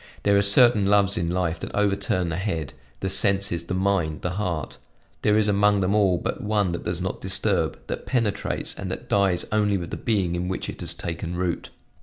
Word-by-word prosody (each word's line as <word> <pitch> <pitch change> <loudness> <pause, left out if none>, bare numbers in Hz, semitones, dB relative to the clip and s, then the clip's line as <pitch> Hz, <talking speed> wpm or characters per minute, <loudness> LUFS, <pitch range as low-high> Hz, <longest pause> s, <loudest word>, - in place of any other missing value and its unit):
There 100 0 +3
are 100 - +5
certain 105 +1 +5
loves 100 -1 +4
in 85 -1 -1
life 85 -2 -1
that - - -6
overturn 100 -3 +1
the 80 - -2
head, 85 -7 -3 0.3
the 95 - -1
senses, 95 -3 +1
the 90 - -3
mind, 95 -5 0
the 90 - -1
heart; 90 -6 -3 0.4
there 105 0 +3
is 110 -1 +2
among 105 0 +3
them 95 +1 +1
all 100 -4 +3
but - - -4
one 105 -3 +1
that 85 - -5
does 90 0 -2
not 95 - -4
disturb, 95 0 0
that - - -6
penetrates, 115 -6 -1
and - - -6
that - - -6
dies 95 -3 +2
only 105 -2 +2
with 85 -2 -6
the - - -3
being 100 -7 0
in 90 +1 -2
which 95 - -3
it - - -13
has - - +1
taken 85 0 -4
root." 90 -1 -2
95 Hz, 210 wpm, -24 LUFS, 90-105 Hz, 0.4 s, are